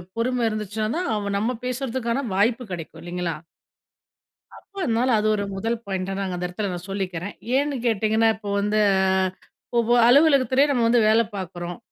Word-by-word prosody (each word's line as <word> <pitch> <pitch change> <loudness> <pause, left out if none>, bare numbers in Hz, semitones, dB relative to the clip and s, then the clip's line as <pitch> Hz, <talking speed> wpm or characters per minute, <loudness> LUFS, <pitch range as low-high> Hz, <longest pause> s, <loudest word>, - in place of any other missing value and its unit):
பொறுமை 245 +1 0
இருந்துச்சுன்னா 215 0 -3
தான், 360 0 -2
அவன் 200 -1 -2
நம்ம 225 +5 -1
பேசறதுக்கான 255 0 -2
வாய்ப்பு 230 +5 +2
கிடைக்கும் 165 -1 -7
இல்லைங்களா? 175 -1 -3 1.2
அப்ப 400 - -21
அதனால, 240 +1 +1
அது 215 - 0
ஒரு 205 - -2
முதல் 225 +4 -1
பாயிண்ட்டா 190 -1 -3
நாங்க 190 -2 -2
அந்த 180 - -3
இடத்துல 195 +3 -3
நான் 175 +1 -7
சொல்லிக்கிறேன். 190 -1 -4 0.2
ஏன்னு 285 +1 +1
கேட்டீங்கன்னா, 220 0 +2
இப்ப 205 -1 -8
வந்து 210 +1 +1 1.0
ஒவ்வொ 235 +1 +2
அலுவலகத்திலே 275 0 +5
நம்ம 245 -4 +1
வந்து 235 +1 +4
வேல 225 +1 +5
பார்க்குறோம். 175 -2 -6
215 Hz, 150 wpm, -23 LUFS, 190-245 Hz, 1.2 s, அலுவலகத்திலே